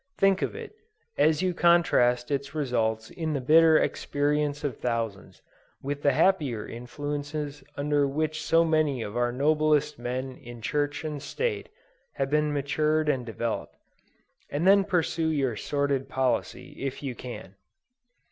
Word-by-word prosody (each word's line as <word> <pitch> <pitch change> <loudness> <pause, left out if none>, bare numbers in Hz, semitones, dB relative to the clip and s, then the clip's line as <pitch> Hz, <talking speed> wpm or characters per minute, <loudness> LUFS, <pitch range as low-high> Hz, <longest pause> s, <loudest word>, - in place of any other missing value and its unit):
Think 195 -1 +3
of - - -2
it, 455 -1 -8 0.4
as 155 +2 +3
you 185 -1 +1
contrast 150 -8 +3
its 140 +1 -2
results 110 -6 -1
in 160 -2 -3
the 140 - 0
bitter 160 +4 +6
experience 145 0 0
of 140 -5 -2
thousands, 115 -5 -3 0.4
with 145 +1 -3
the 140 - +3
happier 145 - +1
influences 145 +3 -5
under 145 0 +1
which 155 +2 -2
so 165 +2 +3
many 155 -6 +1
of 105 - -7
our 120 0 +1
noblest 150 +2 +2
men 130 +2 -4
in 120 -3 -11
Church 145 +6 -1
and 150 -2 -4
State, 455 - -3 0.4
have 135 -1 -2
been 150 0 +2
nurtured 150 +2 +1
and 130 -4 0
developed, 115 0 -3 0.7
and 150 +4 -1
then 195 0 +6
pursue 170 -4 0
your 135 -7 0
sordid 140 +3 -1
policy, 130 -1 -1
if 135 +1 -4
you 135 -3 -3
can. 120 -6 -9
145 Hz, 145 wpm, -27 LUFS, 130-155 Hz, 0.7 s, bitter